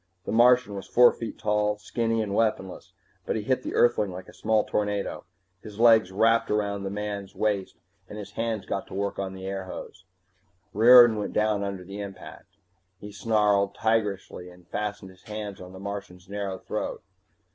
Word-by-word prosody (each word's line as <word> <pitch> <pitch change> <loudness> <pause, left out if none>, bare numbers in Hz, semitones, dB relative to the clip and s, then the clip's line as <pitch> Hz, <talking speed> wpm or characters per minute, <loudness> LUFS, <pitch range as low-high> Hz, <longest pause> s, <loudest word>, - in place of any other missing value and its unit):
The - - -3
Martian 120 -1 +4
was 100 -1 -7
four 120 0 +6
feet 115 -2 -7
tall, 105 0 +1
and 105 - -14
skinny 115 +1 -1
and 100 -2 -4
weaponless, 105 -4 -1 0.4
but - - 0
he 110 - -2
hit 130 +3 0
the - - -5
Earthling 115 -5 +3
like 90 +1 -9
a - - -14
small 110 -1 +1
tornado. 105 -1 -2 0.4
His 105 -1 -11
legs 110 -4 +5
wrapped 115 +3 +3
around 100 -1 -1
the 100 - -3
man's 100 -1 -5
waist 100 -3 -1 0.3
and 105 - -8
his 105 - -8
hands 115 -4 -3
got 95 - -3
to - - -9
work 100 0 -2
on 95 -1 -4
the 95 - -9
airhose. 95 0 -7 0.7
Riordan 120 +1 +8
went 105 - -4
down 105 -1 +1
under 100 -2 -4
the 100 +3 -7
impact. 100 0 -10 0.4
He 105 0 -9
snarled, 105 -2 +1
tigerishly, 105 -5 -1
and 90 -1 -18
fastened 105 -2 -4
his 95 0 -20
hands 105 -3 -6
on 90 0 -10
the 95 - -11
Martian's 100 -2 -7
narrow 100 -1 -4
throat. - - -5
105 Hz, 180 wpm, -26 LUFS, 95-110 Hz, 0.7 s, Riordan